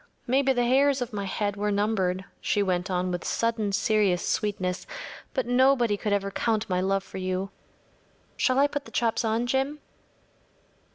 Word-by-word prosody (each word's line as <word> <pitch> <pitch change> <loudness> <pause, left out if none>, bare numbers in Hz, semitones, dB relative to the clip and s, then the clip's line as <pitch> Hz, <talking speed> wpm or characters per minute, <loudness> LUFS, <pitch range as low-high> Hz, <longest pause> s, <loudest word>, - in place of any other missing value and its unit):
Maybe 270 +2 +3
the 245 -2 +1
hairs 275 +2 +3
of 245 -3 -4
my 200 -1 -3
head 205 +1 -2
were 210 +1 -1
numbered,‚ÄĚ 200 -3 0 0.2
she 205 - +1
went 180 -1 -1
on 180 0 0
with 175 -1 -3
sudden 230 -3 0
serious 200 -3 +2
sweetness, 190 -4 -1 0.5
“but 260 - 0
nobody 245 -2 +3
could 205 +1 -3
ever 200 -1 0
count 220 +1 0
my 180 -2 0
love 195 +1 +1
for 190 - -8
you. 185 +1 -2 0.8
Shall 255 0 +2
I 280 - +6
put 290 0 -3
the - - -12
chops 230 0 +1
on, 225 +1 0
Jim? 270 +4 0
210 Hz, 170 wpm, -27 LUFS, 195-245 Hz, 0.8 s, I